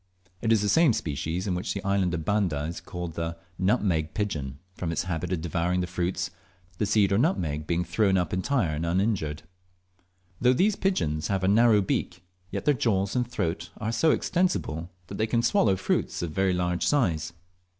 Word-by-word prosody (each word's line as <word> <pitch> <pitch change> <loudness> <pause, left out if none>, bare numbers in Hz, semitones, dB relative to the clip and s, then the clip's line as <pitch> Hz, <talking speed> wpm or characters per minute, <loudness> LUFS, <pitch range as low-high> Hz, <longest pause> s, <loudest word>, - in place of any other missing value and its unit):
It 115 - +1
is 110 -2 +4
the - - +1
same 160 +2 +5
species 80 +3 -3
which 90 +1 -2
in 100 - -4
the - - -4
island 95 -3 +1
of 80 -2 -4
Banda 90 -8 +1
is 85 +3 -5
called 90 -3 -6
the 85 +1 -3 0.2
nutmeg 95 -6 +1
pigeon, 75 -11 -2 0.2
from 90 -3 -3
its 85 - -1
habit 85 0 -3
of 90 -3 -1
devouring 85 +2 0
the - - -1
fruits, 90 0 -2 0.5
the 105 - +1
seed 100 -1 +3
or 100 - +3
nutmeg 80 - 0
being 85 0 +1
thrown 95 +3 +2
up 90 -3 -1
entire 95 - +1
and 75 +2 -2
uninjured. 85 -3 0 1.0
Though 125 +1 +4
these 195 +10 +3
pigeons 80 - 0
have 95 -2 -1
a - - +2
narrow 110 +1 +5
beak, 90 -1 -2 0.3
yet - - -4
their 150 - +5
jaws 100 -5 0
and 125 -1 +1
throat 85 -6 -2
are 110 +1 -2
so 135 +8 +3
extensible 155 - 0 0.2
that 100 +3 -8
they 110 - +2
can 115 +1 +1
swallow 115 -4 +3
fruits 90 - -1
of 85 - -3
very 95 +2 +1
large 90 0 0
size. 85 - +1
90 Hz, 190 wpm, -27 LUFS, 85-110 Hz, 1.0 s, same